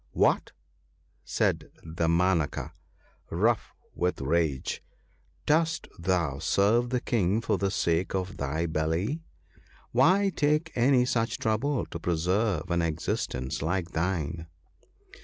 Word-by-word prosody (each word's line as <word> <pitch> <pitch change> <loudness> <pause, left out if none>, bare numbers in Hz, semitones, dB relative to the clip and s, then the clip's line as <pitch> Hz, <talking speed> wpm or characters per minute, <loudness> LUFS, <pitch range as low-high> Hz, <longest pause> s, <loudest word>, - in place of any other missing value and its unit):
1 - - -8
W - - +7
r - - +4
hat! - - -13 0.4
' - - -40 0.3
said - - 0 0.2
Damanaka, 85 0 +1 0.6
rough - - +1 0.2
with 90 +1 -1
rage, 75 -1 0 0.3
* - - -36 0.3
dost 160 +1 +1
thou 85 -6 0
serve 115 +9 +2
the 125 0 +1
King 105 -4 +1
for 115 - 0
the 100 - +1
sake 85 -1 0
of 95 +1 -3
thy 75 +4 -1
belly? 80 - -1 0.7
Why 185 +11 +4
take 150 +2 +1
any 125 +1 +4
such 115 -4 0
trouble 120 +6 0
to 85 - -7
preserve 90 +1 0
an 85 0 +2
existence 75 -5 -2
like 85 +2 -1
thine 80 -2 -2
90 Hz, 130 wpm, -28 LUFS, 80-120 Hz, 0.7 s, W